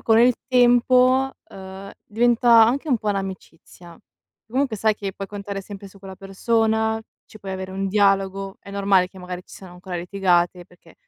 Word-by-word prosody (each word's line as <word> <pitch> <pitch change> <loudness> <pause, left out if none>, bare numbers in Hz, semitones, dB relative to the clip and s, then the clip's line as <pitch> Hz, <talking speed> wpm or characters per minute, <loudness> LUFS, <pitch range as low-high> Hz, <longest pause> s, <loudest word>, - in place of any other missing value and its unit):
con 225 -1 +3
il 245 +2 +5 0.2
tempo, 255 +1 +4 0.2
ehm, 190 +1 -10
diventa 235 +1 +4
anche 275 +7 -1
un 250 - +3
po' 215 - -5
un'amicizia. 185 -3 -8 0.5
Comunque 255 -2 -1
sai 215 +1 +1
che 195 -2 -6
puoi 195 +1 -7
contare 200 -1 -6
sempre 200 0 -10
su 195 0 -16
quella 190 -1 -11
persona, 220 +3 0 0.3
ci 215 - -15
puoi 195 -1 -7
avere 190 0 -6
un 195 0 -3
dialogo, 195 -1 +1
è 200 - -13
normale 195 -2 +2
che 190 - -16
magari 180 0 -7
ci - - -19
siano 185 -2 -13
ancora 180 0 -7
litigate 180 -1 0
perché 180 0 -21
195 Hz, 175 wpm, -22 LUFS, 190-225 Hz, 0.5 s, il